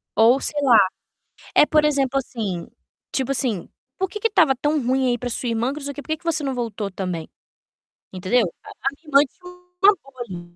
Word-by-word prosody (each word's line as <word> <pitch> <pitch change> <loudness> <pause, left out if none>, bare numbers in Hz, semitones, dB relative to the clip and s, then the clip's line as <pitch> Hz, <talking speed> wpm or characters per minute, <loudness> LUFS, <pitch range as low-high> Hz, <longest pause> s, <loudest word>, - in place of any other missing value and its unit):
ou 235 +4 +5
sei 295 - +1
lá. 250 -5 +6 0.8
É, - - +7
por 305 0 +3
exemplo, 275 -3 +1
assim, 210 -9 -3 0.4
tipo 265 0 -1
assim: 240 -9 0 0.3
"Por 380 -1 -1
que 420 - -6
que 455 - +2
estava 330 -11 +4
tão 295 +3 0
ruim 260 +1 +2
aí 240 - 0
pra 245 +1 -4
sua 240 +1 -3
irmã, 230 +3 0
que 300 - -7
não 280 - -7
sei 285 - -3
o - - -12
quê, 290 - -6
por - - -18
que 315 - 0
que 345 - -29
você 320 -3 0
não 270 -1 -1
voltou 220 -4 -3
também?", 180 -4 -4 0.8
entendeu? 185 +7 +2 0.2
A - - -12 0.3
minha 330 - -34
irmã 280 -2 +6
tinha 360 0 -13 0.3
uma 410 +1 +8
boa 260 -3 -8
vida 175 -2 -9
265 Hz, 220 wpm, -22 LUFS, 225-300 Hz, 0.8 s, uma